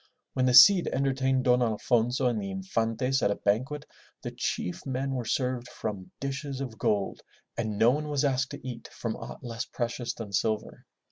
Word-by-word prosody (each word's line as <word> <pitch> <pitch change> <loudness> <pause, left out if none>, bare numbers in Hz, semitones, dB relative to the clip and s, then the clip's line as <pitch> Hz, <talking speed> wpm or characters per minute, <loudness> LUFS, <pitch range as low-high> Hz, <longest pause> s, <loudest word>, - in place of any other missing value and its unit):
When 130 -1 +2
the 125 - +4
Cid 175 +8 +9
entertained 130 -1 +1
Don 125 0 +4
Alfonso 120 +2 +1
and 120 -4 +1
the 100 - -4
Infantes 115 +7 -1
at - - +3
a 100 - +1
banquet, 130 +9 -1 0.4
the - - -4
chief 90 - -3
men 135 0 -2
were 125 -3 -2
served 125 +1 -1
from 100 -4 -5
dishes 140 0 -4
of 125 -5 -6
gold 100 -2 0 0.3
and 110 -3 -2
no 115 +3 +5
one 150 +3 -2
was 145 -1 0
asked 135 -1 +1
to 130 - -8
eat 115 -2 -7
from 115 -2 -4
aught - - -9
less 115 -1 -4
precious 120 0 -3
than 105 -3 -7
silver. 110 +2 -1
125 Hz, 185 wpm, -28 LUFS, 110-135 Hz, 0.4 s, Cid